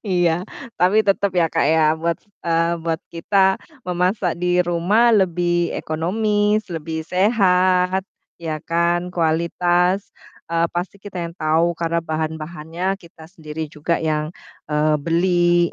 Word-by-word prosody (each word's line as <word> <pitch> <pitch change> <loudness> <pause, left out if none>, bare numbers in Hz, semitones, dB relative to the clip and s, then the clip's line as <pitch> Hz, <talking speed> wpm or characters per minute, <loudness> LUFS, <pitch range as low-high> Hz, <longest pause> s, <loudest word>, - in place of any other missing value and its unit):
Iya 175 -2 +1 0.3
tapi 185 +4 +3
tetep 200 0 +2
ya, 175 -2 +3
Kak, - - +1
ya 160 +1 +3 0.2
buat 170 0 0 0.3
eee, 165 0 +1
buat 165 -1 -1
kita 190 +3 +2 0.3
memasak 180 +1 0
di 180 0 +1
rumah 180 +8 +3
lebih 175 -3 +1
ekonomis, 210 +6 0
lebih 160 -1 -4
sehat 185 -2 +2 0.3
ya 160 -2 -4
kan, 170 +2 0
kualitas, 175 +3 +1 0.4
eee, 170 0 +2
pasti 175 +3 -3
kita 200 -2 -9
yang 170 - -6
tau 160 +2 +2
karena 170 0 -1
bahan-bahannya 160 +2 -4
kita 165 -2 -15
sendiri 160 -3 -6
juga 160 +3 -1
yang, 155 -1 0 0.4
eee, 150 0 +2
beli. 175 +1 +2
175 Hz, 125 wpm, -21 LUFS, 165-185 Hz, 0.4 s, tapi